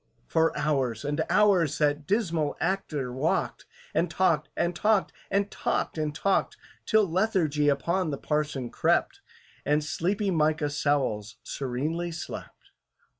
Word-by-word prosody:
For 160 0 +1
hours 135 -5 0
and 145 +2 0
hours 180 -8 +4
that 145 -1 +1
dismal 170 -8 0
actor 155 -9 -2
walked, 140 +6 -1 0.3
And 175 - +1
talked, 170 -4 +1
and 175 0 0
talked, 210 +1 +2 0.2
and 200 +1 0
talked, - - -1
and 155 -2 -2
talked, 195 +5 +1 0.3
Till 220 -1 +4
lethargy 165 -6 +1
upon 170 +5 0
the 140 - -2
parson 150 -4 -2
crept, - - +1 0.4
And 150 +1 +2
sleepy 195 +6 -1
MICAH 155 -2 +1
SOWLS 135 -8 0
serenely 150 +7 -3
slept. 165 - -8
155 Hz, 125 wpm, -27 LUFS, 145-180 Hz, 0.4 s, hours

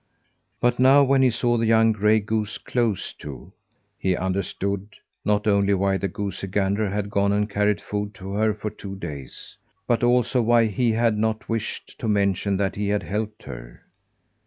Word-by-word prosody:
But 120 0 +1
now, 135 +2 +7
when 135 0 +3
he 130 - +5
saw 120 +1 +1
the 115 0 +1
young 115 0 +5
gray 105 +1 +3
goose 110 0 -2
close 115 -6 -1
to, - - -9 0.5
he 95 -2 +1
understood, 95 +1 -2 0.4
not 105 0 +1
only 100 -1 +3
why 95 0 +1
the 100 - -2
goosey 95 -1 -5
gander 100 +2 0
had 100 +1 -3
gone 100 0 +2
and 105 0 +1
carried 105 0 +1
food 105 0 -4
to 95 +1 -8
her 110 +2 +2
for 105 0 -5
two 100 -1 -8
days, 70 -9 -8 0.3
but 120 -1 +1
also 125 +1 +3
why 115 0 +4
he 115 +2 +1
had 115 -1 +1
not 110 0 -1
wished 115 -1 -4
to - - -3
mention 100 -1 +1
that 100 -1 0
he 105 0 -2
had 105 0 0
helped 105 +1 -4
her. - - -10
105 Hz, 180 wpm, -24 LUFS, 100-115 Hz, 0.5 s, now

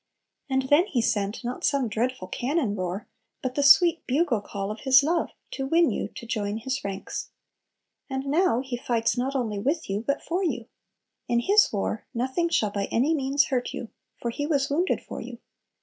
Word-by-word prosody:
And 265 0 +1
then 290 +8 +4
He 255 - 0
sent 205 -1 0
not 245 +1 -4
some 280 -4 +2
dreadful 225 -2 -2
cannon 250 - -1
roar, 185 +1 -4 0.4
but 255 -1 -2
the 285 - 0
sweet 330 +4 +6
bugle 260 -5 +2
call 200 0 -4
of 215 - -6
His 265 +1 +6
love 335 +4 +1 0.2
to 270 -1 -3
win 330 +3 +4
you - - -2
to 235 - -8
join 210 -2 -2
His 260 +4 -3
ranks. 195 -1 -5 0.8
And 265 0 -3
now 290 -3 +2
He 260 -2 -4
fights 235 -2 0
not 260 +3 -1
only 220 -6 -1
with 290 +10 -1
you, 200 +2 -1
but 280 +1 0
for 360 +3 -1
you. 345 - -1 0.6
In 235 0 +2
His 415 - +4
war 210 +1 -2
"nothing 260 +8 0
shall 215 -10 +1
by 200 -1 -1
any 265 +11 +1
means 275 -1 +2
hurt 255 -3 -1
you," 230 - -6 0.3
for 235 - -2
"He 290 +5 -3
was 280 -3 +1
wounded" 345 +6 +1
for - - -7
you. - - -8
260 Hz, 195 wpm, -26 LUFS, 225-290 Hz, 0.8 s, sweet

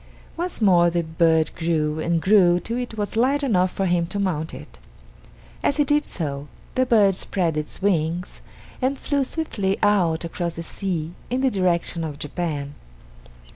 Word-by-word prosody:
Once 350 +1 -3
more 175 -3 +5
the 170 0 0
bird 160 -1 +2
grew 160 -2 0
and 165 0 0
grew 185 -3 +5
till 230 +7 -4
it 245 -2 -4
was 205 0 -3
large 270 +5 +2
enough 185 -8 +2
for 195 - -2
him 175 -2 +1
to 180 - -5
mount 170 -5 -1
it. 75 - -11 0.8
As 280 - +1
he 295 - +4
did 295 +1 +2
so, 145 -4 -4 0.3
the 255 0 +1
bird 210 -5 +5
spread 175 -3 -1
its 150 +4 -5
wings 175 -2 0 0.4
and 265 +2 +1
flew 280 0 0
swiftly 210 -10 -1
out 175 -6 +2
across 170 0 -3
the 165 - -5
sea 170 -2 -3 0.2
in 250 +2 0
the 265 -1 +2
direction 175 -3 0
of 150 -3 -5
Japan. 150 -2 -4
180 Hz, 170 wpm, -23 LUFS, 165-215 Hz, 0.8 s, more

